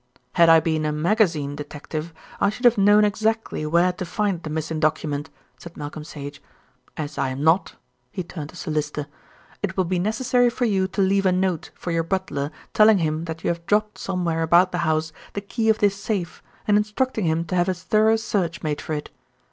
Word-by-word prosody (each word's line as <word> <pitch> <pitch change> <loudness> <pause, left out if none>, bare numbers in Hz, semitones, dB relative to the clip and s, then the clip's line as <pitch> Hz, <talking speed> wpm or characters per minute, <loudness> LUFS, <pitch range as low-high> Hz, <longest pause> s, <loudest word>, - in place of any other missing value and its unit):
"Had 170 -2 +5
I 165 0 +8
been 160 -1 0
a 150 - 0
magazine 155 -3 +1
detective 155 +2 -6 0.3
I 200 - +3
should 230 +5 -5
have 240 -1 +7
known 205 +1 +5
exactly 215 -5 -1
where 170 +3 +3
to 185 - -5
find 190 0 -1
the 160 - -6
missing 160 +1 -3
document," 155 -1 -1 0.3
said 170 +4 -11
Malcolm 150 +1 -6
Sage. 145 -2 -8 0.6
"As 150 -1 -5
I 135 - +1
am 130 +2 -4
not" 165 +4 +3 0.3
he 185 - -4
turned 155 -3 -7
to - - -13
Sir - - -5
Lyster 150 -1 -2 0.6
"it 195 -2 -3
will 185 - +3
be 180 +1 0
necessary 245 +5 +2
for 245 +1 -1
you 190 -4 +1
to 195 +1 0
leave 195 0 +2
a - - +4
note 180 -3 0
for 175 - -5
your 165 0 +1
butler 165 -5 -2 0.2
telling 215 -1 +6
him 160 -1 -1
that 165 -1 -6
you - - +1
have 170 0 -2
dropped 210 0 +1
somewhere 175 -4 -1
about 175 +3 +4
the 180 - -2
house 155 0 0 0.2
the 200 - -3
key 220 +3 -1
of 220 - +4
this 200 -1 +2
safe, 200 -4 -3 0.3
and 205 -1 +5
instructing 215 +1 0
him 165 +1 +1
to 175 - -3
have 175 +1 +2
a 185 - 0
thorough 215 +5 +3
search 195 -7 -2
made 150 -2 -2
for 155 - -4
it. 150 -1 -4
175 Hz, 210 wpm, -23 LUFS, 155-205 Hz, 0.6 s, I